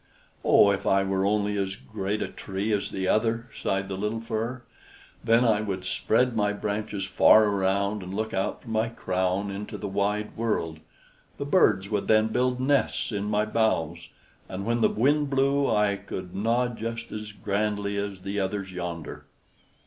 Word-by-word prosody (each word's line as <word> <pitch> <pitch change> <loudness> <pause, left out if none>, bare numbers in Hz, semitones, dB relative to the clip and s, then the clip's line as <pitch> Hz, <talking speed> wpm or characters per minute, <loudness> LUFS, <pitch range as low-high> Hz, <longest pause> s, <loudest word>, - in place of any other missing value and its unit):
"Oh, 100 - +6
if 100 - -2
I 95 0 +4
were 95 0 0
only 105 0 +1
as 95 0 -2
great 105 0 -3
a - - -3
tree 100 +2 -3
as 100 - 0
the 95 -1 -3
other!" 115 +3 +1
sighed 95 0 -1
the 95 - -4
little 105 +3 -2
Fir, 115 +2 -3 0.6
"then 115 +2 +4
I 105 -2 +3
would 95 -3 -4
spread 115 +6 +1
my 105 -1 +1
branches 105 -1 -3
far 110 +3 +6
around, 100 +1 0
and 90 0 -7
look 110 +3 -3
out 95 0 -2
from 115 - -8
my 110 +1 +1
crown 95 -2 -1
into 100 +1 -6
the 105 - -5
wide 100 +2 -1
world. 85 -9 -1 0.6
The - - -3
birds 95 +1 +3
would 105 -2 -1
then 110 0 +4
build 125 +2 +1
nests 135 -1 +1
in 100 -1 -2
my 105 0 +1
boughs, 85 -7 0 0.4
and 95 +1 -5
when 120 +1 0
the - - +5
wind 145 +5 +2
blew 140 +1 +2
I 105 -2 +2
could 95 -2 -7
nod 120 +3 0
just 115 +1 -5
as 105 0 -6
grandly 105 -1 -1
as 100 -2 -4
the 100 +2 -3
others 95 0 -2
yonder." 85 -3 -6
105 Hz, 175 wpm, -26 LUFS, 95-115 Hz, 0.6 s, Oh